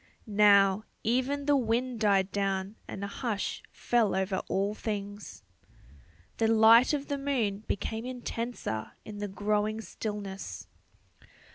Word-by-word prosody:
Now, 205 -2 +5 0.2
even 260 +5 0
the 290 0 +4
wind 245 -1 0
died 200 -3 +3
down 195 0 -1
and 195 - -6
a - - -2
hush 210 0 -3
fell 230 -5 +1
over 190 0 0
all 200 +2 0
things. 205 - -6 0.9
The 225 - +2
light 225 +2 +7
of 290 -2 -1
the 285 -1 -2
moon 240 -8 0
became 220 +3 -3
intenser 235 - -4
in 210 -1 -8
the 205 - -2
growing 210 +2 -1
stillness. 195 - -6
210 Hz, 125 wpm, -29 LUFS, 200-235 Hz, 0.9 s, light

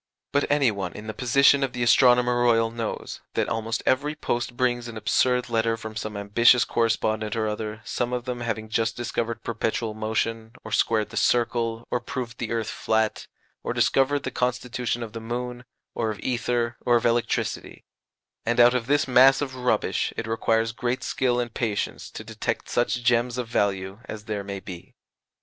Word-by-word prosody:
But 145 - +1
any 145 -5 +3
one 95 -4 -4
in 105 - -9
the 110 - -5
position 140 +4 +4
of 130 -2 -1
the 125 -1 -1
Astronomer 125 0 +5
Royal 115 -2 +3
knows 115 -1 -5
that - - +1
almost 115 0 -2
every 145 +4 +1
post 120 -4 -2
brings 120 -2 0
an 115 -1 -7
absurd 125 +3 +2
letter 115 -1 +1
from 110 -1 -8
some 105 -1 -4
ambitious 115 +4 +4
correspondent 110 -2 0
or 110 -1 0
other, 105 0 -4
some 120 -1 -2
of 125 -1 -3
them 125 -1 -4
having 110 -2 -3
just 110 0 -1
discovered 115 -1 -3
perpetual 115 -1 -2
motion, 110 +1 -2
or - - -9
squared 110 -2 +1
the 115 - -6
circle, 115 -1 +1
or 125 - +1
proved 120 -1 -6
the 115 - -3
earth 115 -2 -1
flat, 110 0 -1 0.4
or - - -2
discovered 140 +1 +2
the 130 - -3
constitution 125 -1 -2
of 110 -2 -8
the 115 - -5
moon, 125 +2 -5 0.3
or 115 - -1
of 105 - -5
ether, 120 -1 -1
or 120 - +3
of 115 - +1
electricity; 120 0 -1 0.6
and 120 +1 0
out 120 +1 +7
of 125 -2 -1
this 145 +1 +2
mass 130 +1 +6
of 140 -3 -3
rubbish 125 -1 0
it - - -2
requires 115 0 +1
great 125 +2 -2
skill 125 -1 0
and 120 -2 -3
patience 110 -4 -2
to - - -8
detect - - -3
such 120 0 0
gems 120 0 +2
of 125 -2 -3
value 100 -2 -1
as 110 -3 -7
there 105 -2 -3
may 100 0 -5
be. 90 -3 -10
120 Hz, 185 wpm, -25 LUFS, 110-125 Hz, 0.6 s, out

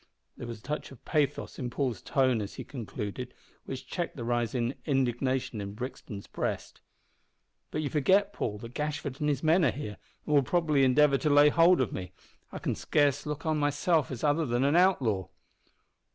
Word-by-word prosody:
There 120 - -7
was 115 -1 -6
a 105 - -21
touch 150 +1 -4
of 135 - -15
pathos 150 -4 -1
in 125 - -2
Paul's 120 -5 -2
tone 130 -5 +2
as 100 - -6
he - - -6
concluded, 120 0 -6 0.3
which 130 - -6
checked 175 -2 -4
the 120 - -5
rising 120 +1 0
indignation 130 -4 0
in 100 0 -6
Brixton's 115 -4 -7
breast. - - -4 0.9
"But 155 - -2
you 145 - -1
forget, 190 +8 +3
Paul, 105 -3 -3
that 115 +3 -9
Gashford 150 -2 -3
and 150 - +1
his 145 -1 -1
men 165 +3 +4
are 145 - +5
here, 105 -4 -5 0.3
and 150 - -1
will 145 - +6
probably 150 -1 +2
endeavour 140 +1 +4
to 155 - +1
lay 145 +1 +7
hold 170 +4 +5
of 125 - -1
me. 90 -1 -6 0.4
I - - -6
can - - -2
scarce 145 0 +1
look 150 0 -4
on 155 -1 +1
myself 145 +1 +1
as 130 - -6
other 150 +1 +2
than 120 +2 +1
an 140 +3 +3
outlaw." 130 - +3
135 Hz, 190 wpm, -29 LUFS, 120-150 Hz, 0.9 s, lay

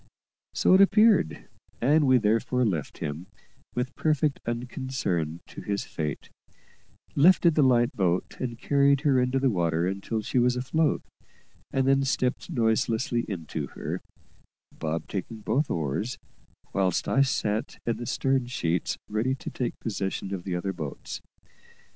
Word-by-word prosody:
So - - +4
it 190 - +7
appeared, 210 - +4 0.3
and 145 +4 +4
we 130 -1 +6
therefore 115 +3 +1
left 85 -9 -2
him, 80 +4 -5 0.5
with 125 +2 -2
perfect 150 -2 +1
unconcern, 120 - -2
to - - -10
his 100 -1 -2
fate; 75 -3 -5 0.8
lifted 170 +2 +6
the 150 - +3
light 120 -3 +3
boat 90 -2 0
and 120 -3 -3
carried 140 +1 +3
her 140 -4 +3
into 125 +1 +1
the 135 -1 +2
water 85 -3 +1
until 100 +4 -2
she 125 - +1
was 125 0 +3
afloat, 145 +5 +1 0.7
and 135 0 +1
then 135 0 +4
stepped 130 -2 -1
noiselessly 115 +1 +1
into 85 -6 -4
her - - -4 0.7
Bob 80 +1 -4
taking 105 +3 -5
both 140 +7 0
oars, 80 - -2 0.6
whilst 95 -3 +1
I 135 - +3
sat 110 -5 0
in 115 - 0
the 120 - -6
stern 135 -2 +1
sheets 85 -8 -1
ready 115 +5 0
to - - -7
take 125 -2 -3
possession 100 -2 -3
of 90 -2 -5
the 90 -2 -2
other 95 +2 -2
boats. 75 -5 -6
120 Hz, 145 wpm, -27 LUFS, 95-135 Hz, 0.8 s, it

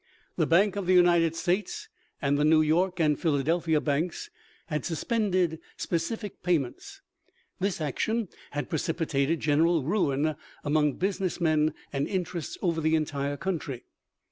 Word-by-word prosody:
The - - +1
Bank 195 +4 +4
of 200 -3 -3
the 185 - +5
United 170 -2 +4
States 180 +4 -1 0.3
and 140 -1 +1
the 145 - +2
New 155 +1 +5
York 175 +4 +1
and 150 -3 +2
Philadel 160 +1 +1
phia 160 -2 +2
Banks 165 - -2 0.3
had 150 -5 -3
suspended 185 -2 0 0.2
specie 205 +4 -2
payments. 160 -9 -2 0.6
This 195 -1 -1
action 215 - -1 0.2
had 145 0 -3
precipitated 160 -2 0
general 155 +1 +3
ruin 155 -3 +1 0.3
among 150 -1 +2
business 190 +1 -2
men 155 -2 +2 0.2
and 140 0 0
interests 180 -4 -3
over 165 -3 +1
the 160 +1 +2
entire 145 -2 -1
country. 150 -9 -3
165 Hz, 140 wpm, -28 LUFS, 150-180 Hz, 0.6 s, the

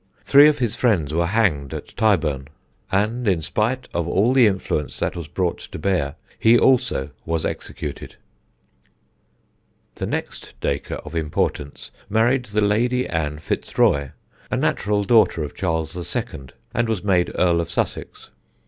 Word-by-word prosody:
Three 145 +2 +7
of 150 - +3
his 120 -4 -1
friends 90 - +1
were 85 +1 +1
hanged 85 - +1
at - - -9
Tyburn, 75 -11 +1 0.4
and, 110 +5 0
in 90 -5 +2
spite 115 +10 -1
of 85 -1 -1
all 105 +8 +2
the 130 -4 +6
influence 95 -7 -2
that - - -2
was 85 -3 -6
brought 85 +1 -1
to - - -9
bear, 75 -5 0 0.2
he 115 +1 +6
also 125 - +2
was 80 -1 -1
executed. - - -6 1.8
The - - -4
next - - -5
Dacre - - -2
of 75 - -9
importance 75 -2 -2 0.2
married 120 +4 +2
the 105 -1 -1
Lady 120 +5 +1
Ann 75 -3 -2
Fitzroy, 70 -2 0 0.4
a - - -1
natural 105 0 0
daughter 105 -6 +4
of 75 - -6
Charles 80 -3 -2 0.2
II., 65 -1 -4 0.3
and 120 0 0
was 110 -4 -1
made 90 -3 +2
Earl 85 -2 +3
of 85 - -5
Sussex. - - -4
95 Hz, 150 wpm, -22 LUFS, 80-115 Hz, 1.8 s, Three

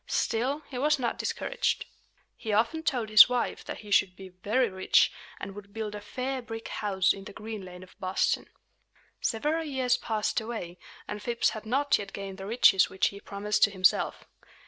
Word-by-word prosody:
Still, 260 +6 0
he 250 - -6
was 295 +2 +3
not 240 -3 -2
discouraged. - - -1 0.5
He 220 - -5
often 230 +10 +1
told 250 -9 -1
his 215 +2 +9
wife 250 -1 -1
that - - -6
he 210 -1 -11
should 190 -2 +3
be 190 0 -10
very 205 +8 0
rich, 190 -2 +3 0.3
and 195 - -6
would 200 0 -12
build 215 -2 -4
a 210 - -6
"fair 260 +4 -4
brick 225 -1 -7
house" 195 -3 +1
in 195 0 -10
the 205 - -9
Green 215 -1 -7
Lane 180 0 -10
of 185 - -17
Boston. 185 0 0 0.7
Several 300 +8 0
years 260 -4 +1
passed 220 -2 -1
away; 215 -6 -6 0.3
and 210 - -5
Phips 235 +1 +1
had 220 -1 -8
not 280 +5 +2
yet 200 -1 -7
gained 195 -1 -6
the 195 - -6
riches 210 -4 +5
which 190 - +1
he 200 - -10
promised 210 +1 -1
to - - -3
himself. 185 -2 +1
215 Hz, 190 wpm, -28 LUFS, 195-250 Hz, 0.7 s, his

